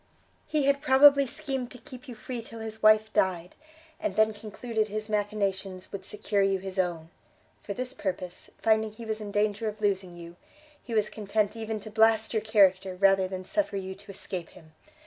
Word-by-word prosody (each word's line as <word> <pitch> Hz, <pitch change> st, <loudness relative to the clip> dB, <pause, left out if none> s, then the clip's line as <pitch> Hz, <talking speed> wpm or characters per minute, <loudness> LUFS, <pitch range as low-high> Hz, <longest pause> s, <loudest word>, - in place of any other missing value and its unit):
he 305 Hz, -2 st, +1 dB
had 280 Hz, 0 st, +2 dB
probably 280 Hz, +1 st, +7 dB
schemed 260 Hz, -1 st, -4 dB
to 255 Hz, -, -10 dB
keep 255 Hz, +2 st, -12 dB
you 245 Hz, -, -8 dB
free 235 Hz, +2 st, -6 dB
till 225 Hz, 0 st, -10 dB
his 220 Hz, 0 st, -6 dB
wife 215 Hz, 0 st, +5 dB
died, 180 Hz, -2 st, +1 dB, 0.5 s
and 190 Hz, -, -2 dB
then 220 Hz, +1 st, +4 dB
concluded 215 Hz, +1 st, -3 dB
his 215 Hz, +1 st, -5 dB
machinations 200 Hz, -3 st, -2 dB
would 195 Hz, -1 st, -6 dB
secure 205 Hz, +1 st, -1 dB
you 195 Hz, 0 st, +2 dB
his 190 Hz, 0 st, -5 dB
own. 170 Hz, -3 st, -1 dB, 0.5 s
For 200 Hz, -, -6 dB
this 255 Hz, +1 st, -4 dB
purpose, 180 Hz, -4 st, -5 dB
finding 220 Hz, -1 st, +2 dB
he 230 Hz, +1 st, -9 dB
was 220 Hz, 0 st, -3 dB
in 210 Hz, -, -5 dB
danger 210 Hz, +1 st, 0 dB
of 215 Hz, 0 st, -4 dB
losing 190 Hz, -4 st, -1 dB
you, 170 Hz, 0 st, -11 dB, 0.4 s
he 235 Hz, -, -5 dB
was 215 Hz, -1 st, +3 dB
content 210 Hz, 0 st, -1 dB
even 220 Hz, -1 st, -4 dB
to 215 Hz, -, -9 dB
blast 220 Hz, 0 st, +3 dB
your 220 Hz, -, +1 dB
character, 195 Hz, -4 st, +3 dB
rather 195 Hz, 0 st, +4 dB
than 185 Hz, 0 st, -6 dB
suffer 295 Hz, -, -1 dB
you 190 Hz, -1 st, -4 dB
to 200 Hz, +2 st, -15 dB
escape 185 Hz, -3 st, -6 dB
him! 160 Hz, -3 st, -17 dB
210 Hz, 190 wpm, -28 LUFS, 190-225 Hz, 0.5 s, probably